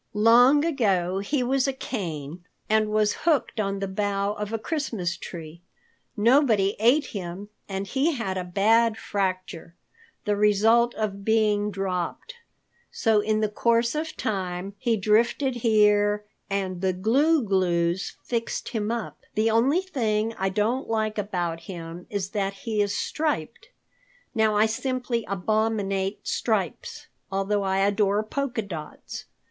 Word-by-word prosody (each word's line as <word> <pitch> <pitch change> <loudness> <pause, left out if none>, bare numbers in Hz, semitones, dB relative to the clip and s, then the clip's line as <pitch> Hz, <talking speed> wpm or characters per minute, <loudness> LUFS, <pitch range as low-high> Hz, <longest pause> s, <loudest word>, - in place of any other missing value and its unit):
Long 245 +7 +6
ago 195 - +1
he 250 +7 -1
was 265 +2 +1
a 270 - 0
cane 170 - -5 0.2
and 215 0 +2
was 215 -1 +2
hooked 300 -7 +1
on 200 -1 -1
the 195 0 -3
bough 200 +1 -1
of 210 0 -5
a 225 - 0
Christmas 220 - -2
tree. 165 -1 -9 0.6
Nobody 220 -4 +4
ate 250 +7 +4
him 195 0 -6 0.2
and 195 0 -3
he 275 - +1
had 200 -8 -3
a 185 - -2
bad 220 +5 +3
fracture, 185 -5 -3 0.5
the 210 -1 +1
result 220 +4 +3
of 200 -2 -3
being 210 -1 +2
dropped. 195 - -3 0.6
So 220 -2 +2
in 215 +1 0
the 215 - +2
course 230 +2 +1
of 315 +1 -4
time, 190 -2 -3
he 235 -3 +1
drifted 235 +5 +2
here 210 -2 +3 0.2
and 190 -2 -2
the 190 -1 +1
Gloo 270 - +3
Gloos 180 -2 0
fixed 230 -1 -3
him 215 -4 -2
up. 235 -1 -4 0.2
The 220 +1 +2
only 265 +10 +3
thing 225 - -1
I 190 0 -1
don't 220 +7 -1
like 215 -1 0
about 175 -5 -2
him 170 0 -8
is 195 -2 -3
that 200 -2 -1
he 210 +2 -2
is 200 -1 0
striped. 300 - -2 0.6
Now 220 -1 +2
I 210 +1 +5
simply 245 0 -2
abominate 200 0 -1
stripes, - - -2 0.3
although 195 +1 0
I 190 -1 0
adore 200 +1 +2
polka 245 0 -2
dots. 165 -6 -8
210 Hz, 140 wpm, -25 LUFS, 195-230 Hz, 0.6 s, Long